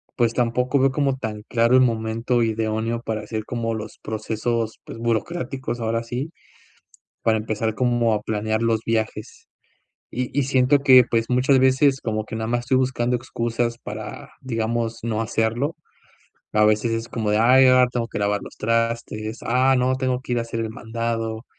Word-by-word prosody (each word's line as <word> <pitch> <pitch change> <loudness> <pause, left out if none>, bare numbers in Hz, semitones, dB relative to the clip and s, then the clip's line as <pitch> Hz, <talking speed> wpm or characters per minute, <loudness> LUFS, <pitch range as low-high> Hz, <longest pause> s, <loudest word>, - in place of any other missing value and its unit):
pues 120 -3 +2
tampoco 125 +3 +1
veo 135 0 +3
como 135 -1 0
tan 110 -4 -5
claro 115 +1 +3
el 130 - +7
momento 115 0 +1
idóneo 110 +1 -1
para 110 -2 -3
hacer 110 0 -4
como 115 -1 -2
los 110 -1 -6
procesos, 110 +1 -2
pues, - - -9
burocráticos, 125 +2 -2
ahora 115 +1 -1
sí, 130 +7 -4 0.9
para 110 -1 +2
empezar 110 0 -2
como 120 -2 +2
a 105 - -1
planear 110 +1 -1
los 115 -1 +2
viajes, 110 -1 -3 0.7
y 125 0 -2
y 140 - +3
siento 135 +1 +3
que, 130 -2 +8
pues, 115 -1 +1
muchas 130 +2 +3
veces 130 +1 +3
como 110 -1 -2
que 110 - -6
nada 110 0 -3
más 120 +1 +1
estoy 125 +2 +1
buscando 125 -1 0
excusas 120 -1 -2
para, 105 0 -8
digamos, 115 -2 -2
no 110 -1 -1
hacerlo. 115 +7 -1 0.8
A 105 0 +4
veces 110 +2 +2
es 115 +1 -3
como 110 -3 -2
de: 105 - +2
"Ay, 130 +4 +6
ahora 130 -1 +6
tengo 120 -2 -2
que - - -4
lavar 100 0 0
los - - -11
trastes. 115 -1 -1
Ah, 130 +3 +3
no, 130 +1 +2
tengo 130 -1 -1
que 130 - -5
ir 120 - +1
a - - 0
hacer 115 0 -4
el 110 -1 -3
mandado 115 0 -3
115 Hz, 180 wpm, -23 LUFS, 110-125 Hz, 0.9 s, que